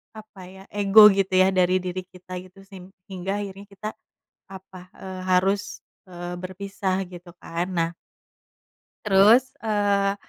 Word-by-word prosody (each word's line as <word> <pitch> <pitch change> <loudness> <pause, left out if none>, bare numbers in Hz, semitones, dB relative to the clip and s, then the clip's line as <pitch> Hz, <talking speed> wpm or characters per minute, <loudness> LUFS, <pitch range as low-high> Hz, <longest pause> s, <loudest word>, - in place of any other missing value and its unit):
apa 215 -2 -13
ya, 190 +1 -13
ego 205 +1 +8
gitu 195 -1 -1
ya, 185 0 +5
dari 185 0 +3
diri 185 0 -4
kita 185 0 -11
gitu, 185 +1 -16
sehingga 190 +1 -7
akhirnya 200 0 -9
kita, 210 +2 -6 0.6
apa, 185 -1 -12
eee, 190 -1 -8
harus, 195 +2 0 0.3
eee, 175 0 -7
berpisah, 190 +1 -3
gitu 175 0 -11
kan. 170 +2 -4
Nah 165 -1 0 1.1
terus, 215 +6 +5
eee, 205 -2 +1
190 Hz, 130 wpm, -24 LUFS, 185-200 Hz, 1.1 s, ego